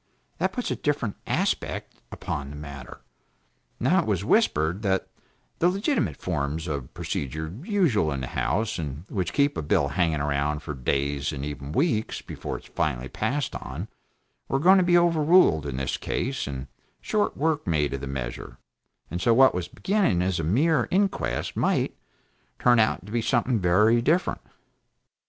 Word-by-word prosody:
That - - +1
puts 250 - -3
a - - 0
different 140 -8 -1
aspect - - -1
upon 70 0 -4
the 75 - -8
matter. 70 -3 -9 0.8
Now - - +3
it - - -1
was - - 0
whispered 80 +6 +2
that 95 -3 0 0.5
the 175 - +4
legitimate 195 - 0
forms 75 -2 -2
of 70 -5 -4
procedure 80 +4 -4
usual 170 - +2
in 70 -2 -3
the - - -2
House, 90 - 0
and 75 +1 -5
which 90 -4 -2
keep 140 0 +2
a - - -2
bill 70 -1 +1
hanging 80 0 +1
along 70 +1 0
for 75 0 -6
days 70 +2 -1
and 70 -2 -4
even 70 -1 -6
weeks, 110 - 0
before - - -6
it - - -14
is - - -16
finally 65 -4 -1
passed 145 +1 -2
upon, - - -6 0.6
were 135 - +1
going 185 +7 +6
to - - +3
be 175 0 +5
overruled, 165 - +4
in 65 -2 -4
this 65 0 -1
case, 130 - -2
and 65 -2 -5 0.3
short 210 -1 0
work 155 -3 0
made 75 -4 +1
of 70 - -4
the 70 - -5
measure; 65 -3 -5 0.5
and 90 +2 -3
so, 115 +2 +4
what 130 +1 +6
was 90 -1 -3
beginning 185 - +1
as 95 -2 0
a - - -1
mere 130 - +2
inquest 195 +1 0
might, - - +1 0.6
turn 120 -1 +4
out 110 -4 +2
to 105 - -10
be 120 +1 0
something 120 0 +1
very 105 +6 +4
different. 160 +9 +1
90 Hz, 170 wpm, -26 LUFS, -, 0.8 s, going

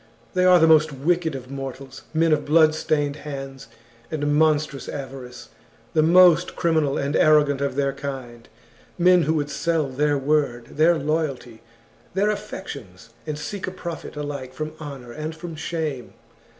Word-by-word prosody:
They 180 0 +2
are 180 -1 +7
the 160 - +5
mcst 155 -4 +3
wicked 170 -2 +1
of 130 0 -8
mortals, 135 -1 -7
men 160 0 +3
of 155 - +1
bloodstained 155 -2 +2
hands 135 -2 -8 0.4
and 145 -2 -1
monstrous 150 -2 +1
avarice, 130 -3 -8 0.4
the 155 - +4
most 175 +1 +5
criminal 160 -5 +1
and 140 +2 -1
arrogant 145 -2 +4
of 140 -2 -1
their 140 -1 0
kind, 130 -4 -7 0.5
men 180 0 +5
who 160 +1 +1
would 145 -2 -2
sell 155 0 0
their 145 +2 +1
word, 140 -4 0
their 165 +2 +3
loyalty, 140 -6 -3 0.5
their 205 +2 +2
affections, 140 - -8 0.2
and 150 -1 -3
seek 190 +6 -5
a - - -3
profit 170 -4 -7
alike 145 -3 -6
from 155 0 -4
honour 140 -5 -8
and 155 +4 -5
from 165 0 -8
shame. 155 -5 -4
150 Hz, 150 wpm, -23 LUFS, 135-160 Hz, 0.5 s, are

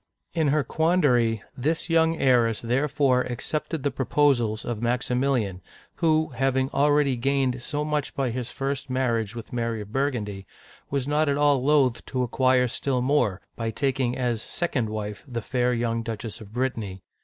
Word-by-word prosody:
In 160 -3 +1
her 150 +1 +2
quandary, 130 - +2
this 155 +7 -1
young 165 -1 +3
heiress 120 -4 +3
therefore 130 +1 +2
accepted 140 +5 -3
the 140 - +1
proposals 130 -5 +1
of 115 -2 -3
Maximilian, 120 -4 0 0.4
who, 160 -2 +2
having 130 0 0
already 145 -1 +3
gained 130 0 0
so 150 +3 -2
much 150 -2 -2
by 135 -3 0
his 125 0 -4
first 135 +1 -3
marriage 120 -4 0
with 115 0 -8
Mary 115 -2 -1
of 105 0 -10
Burgundy, 110 -8 -2 0.4
was 140 -1 -1
not 150 +1 +2
at 140 - +1
all 145 -3 +3
loath 140 -4 +3
to 130 -1 -1
acquire 130 +1 +3
still 125 +1 -1
more, 125 -9 +1
by 115 -1 -2
taking 130 0 0
as 120 -3 -1
second 130 -9 -2
wife 105 -1 -5
the 120 -3 -3
fair 125 +2 0
young 115 -1 0
Duchess 115 -1 -5
of 105 -1 -11
Brittany. 110 -6 -3
130 Hz, 160 wpm, -25 LUFS, 115-140 Hz, 0.4 s, young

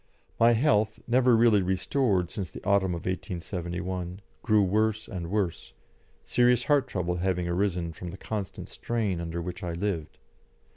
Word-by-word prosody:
My 115 +1 +6
health, 110 -4 +2
never 125 0 +4
really 110 -3 +5
restored 95 0 +1
since 95 -5 -4
the - - -10
autumn 100 -3 +2
of 85 - -7
1871, 90 0 -4 0.2
grew 110 -3 +4
worse 110 +3 +1
and 85 -5 -5
worse, 100 -4 -2 0.5
serious 125 0 +3
heart 145 -3 +3
trouble 90 -5 -2
having 90 -1 0
arisen 85 -2 -1
from 90 +2 -7
the 90 - -8
constant 100 -4 -5
strain 105 -7 -2
under 85 0 -4
which 90 +2 -6
I 85 -2 -3
lived. 85 -3 -3
95 Hz, 150 wpm, -28 LUFS, 90-110 Hz, 0.5 s, My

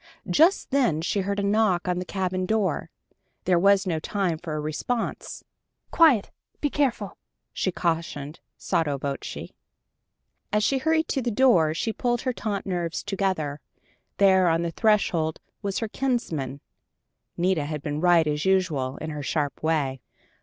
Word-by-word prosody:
Just 320 - +3
then 245 - +2
she 200 - 0
heard 200 +1 -1
a - - -1
knock 200 -3 +2
on 180 0 0
the 180 - -4
cabin 185 -1 -2
door. 205 -7 0 0.5
There 180 -1 +3
was 200 +2 +4
no 165 -4 -1
time 180 -1 -1
for 160 -3 -5
a - - -2
response. 155 +10 -3 0.5
"Quiet! 295 -11 +4 0.3
Be 290 - -1
careful!" 235 -9 -1 0.3
she 185 - -1
cautioned, 165 -4 -2 0.2
sotto 160 -6 0
voce. 140 0 -5 1.0
As 210 0 +2
she 270 +4 +2
hurried 320 +2 +1
to 270 - 0
the 245 - -1
door, 205 -10 +4
she 225 +6 -1
pulled 240 0 0
her 255 -1 -1
taut 205 -4 -3
nerves 175 -3 -2
together. 185 -8 -1 0.6
There 190 -2 +5
on 165 0 +2
the 170 - -2
threshold 170 -6 +1 0.2
was 200 -2 -2
her 225 - -1
kinsman: 170 - -2 0.8
Nita 175 -4 +1
had 150 -1 -5
been 150 0 -3
right 175 -2 +5
as 150 0 -1
usual, 165 -9 +1
in 155 - -5
her 150 -1 -5
sharp 145 0 -2
way. 145 -5 0
185 Hz, 155 wpm, -25 LUFS, 155-210 Hz, 1.0 s, There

